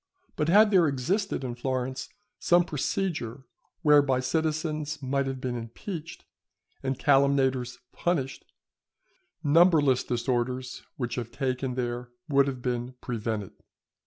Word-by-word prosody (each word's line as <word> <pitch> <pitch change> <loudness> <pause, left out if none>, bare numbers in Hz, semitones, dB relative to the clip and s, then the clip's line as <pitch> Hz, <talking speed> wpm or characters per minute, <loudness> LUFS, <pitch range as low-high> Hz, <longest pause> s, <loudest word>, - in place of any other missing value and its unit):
But 150 - 0
had 210 +4 +6
there 180 -5 +5
existed 170 - -1
in 125 -2 -3
Florence 130 +1 -3 0.3
some 175 0 +4
procedure 150 -5 -2 0.4
whereby 145 -4 +5
citizens 155 +1 -1
might 135 +1 0
have 135 -1 -3
been 125 -1 -3
impeached, 150 - -7 0.6
and 135 -1 -2
calumniators 135 -3 +2
punished, 150 -7 -1 1.0
numberless 150 -4 +5
disorders 125 +1 -2 0.2
which 120 -3 -3
have 120 0 -9
taken 130 -1 -2
there 120 -1 -3 0.2
would 140 -1 +4
have 130 -3 -4
been 125 0 -2
prevented. 110 -4 -3
135 Hz, 115 wpm, -27 LUFS, 125-155 Hz, 1.0 s, had